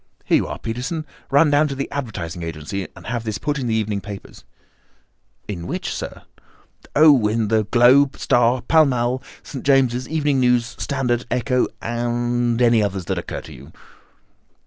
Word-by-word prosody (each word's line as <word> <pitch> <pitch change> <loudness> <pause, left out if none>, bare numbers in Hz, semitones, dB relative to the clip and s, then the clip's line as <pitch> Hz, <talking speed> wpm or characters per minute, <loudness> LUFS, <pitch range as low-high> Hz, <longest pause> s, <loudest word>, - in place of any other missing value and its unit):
Here - - +4
you - - -1
are, - - -5
Peterson, 130 +8 -4 0.2
run 145 +2 +4
down 145 +1 +4
to 140 - -4
the 135 0 -3
advertising 105 -11 -5
agency 85 +4 -5
and - - -13
have 120 0 -3
this 110 -2 -3
put 150 -1 -2
in 125 - -3
the 110 - 0
evening 105 -2 -1
papers." 100 -1 -10 1.0
"In 90 -4 -5
which, - - -3
sir?" - - -6 0.7
"Oh, 145 -7 +6
in 110 0 0
the 110 -1 +2
Globe, 130 +5 +4
Star, 120 +1 +2
Pall 160 +5 +5
Mall, 125 -1 0 0.2
St. 135 - -8
James's 130 -3 +2
Gazette, - - -13
Evening 145 -3 +1
News, 125 -2 +3
Standard, 125 -4 -1
Echo, 125 +1 +1 0.2
and 120 0 -1
any 115 -2 +4
others 95 -3 -2
that - - -2
occur - - -6
to - - -12
you." 70 +5 -13
120 Hz, 170 wpm, -21 LUFS, 110-135 Hz, 1.0 s, Oh